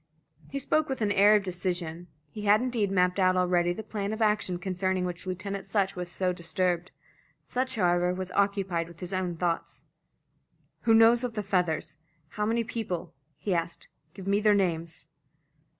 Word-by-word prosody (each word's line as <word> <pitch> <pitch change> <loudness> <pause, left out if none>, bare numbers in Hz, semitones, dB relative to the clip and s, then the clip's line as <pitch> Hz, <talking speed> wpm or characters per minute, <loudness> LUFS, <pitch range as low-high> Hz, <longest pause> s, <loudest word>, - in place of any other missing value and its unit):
He 275 - -4
spoke 310 +3 +1
with 265 -3 -3
an 205 - +1
air 205 +1 +6
of 205 - +2
decision. 175 -2 -3 0.2
He 210 - -7
had 205 +1 +6
indeed 240 -5 0
mapped 180 0 +2
out 185 -1 +4
already 175 -1 +2
the 220 +5 -5
plan 205 -1 -3
of 220 - -5
action 210 -5 +1
concerning 185 0 -1
which 180 +1 -5
Lieutenant 195 +2 -4
Sutch 195 -2 0
was 180 -1 -5
so 180 0 0
disturbed. 175 0 -1 0.6
Sutch, 255 +1 0
however, 175 -3 +2
was 185 0 -4
occupied 195 -4 0
with 170 0 -14
his 180 +1 -5
own 180 -2 -2
thoughts. 170 -1 -2 1.0
"Who 225 - +7
knows 230 +2 +6
of 245 -2 -2
the 210 -2 -3
feathers? 175 -5 -1 0.3
How 210 +5 -2
many 230 +1 +1
people?" 220 -7 -4 0.2
he 190 +5 -2
asked. 170 0 -3 0.3
"Give 190 - -9
me 200 +1 +2
their 210 -1 +5
names." 170 -4 -1
185 Hz, 175 wpm, -28 LUFS, 175-210 Hz, 1.0 s, Who